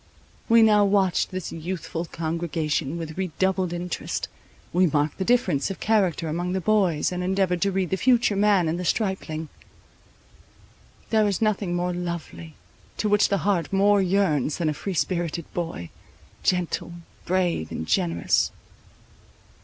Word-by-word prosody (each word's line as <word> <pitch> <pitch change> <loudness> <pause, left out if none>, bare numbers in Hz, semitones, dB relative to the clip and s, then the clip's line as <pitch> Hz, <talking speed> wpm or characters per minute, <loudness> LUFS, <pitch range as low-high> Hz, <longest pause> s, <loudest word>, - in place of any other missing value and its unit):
We 230 0 +7
now 210 -2 +5
watched 195 -2 +2
this 185 -1 -5
youthful 165 0 -4
congregation 160 -2 -2
with 165 +1 -6
redoubled 185 0 0
interest. 175 0 -4 0.4
We 180 +1 +4
marked 150 +1 0
the - - +1
difference 220 - +1
of 195 - -6
character 190 -7 +1
among 175 +3 -2
the 190 - 0
boys, 185 -6 +2
and 180 0 -3
endeavoured 185 -2 0
to 200 - +2
read 190 -2 -1
the 190 - +1
future 240 -2 +3
man 200 -4 +3
in 160 +2 -1
the 180 - -4
stripling. 180 -6 -2 1.6
There 215 -2 +4
is 200 - 0
nothing 205 -5 0
more 180 0 -1
lovely, 170 -2 -6 0.4
to 215 - 0
which 205 0 +4
the 200 -1 -1
heart 195 -5 +1
more 200 +1 +4
yearns 180 -7 +1
than 165 -3 0
a - - 0
free 190 +5 -5
spirited 170 -1 -1
boy, 165 - -4 0.5
gentle, 180 -1 -1 0.3
brave, 175 - 0
and 80 - -4
generous. 85 +1 +1
180 Hz, 145 wpm, -25 LUFS, 165-195 Hz, 1.6 s, We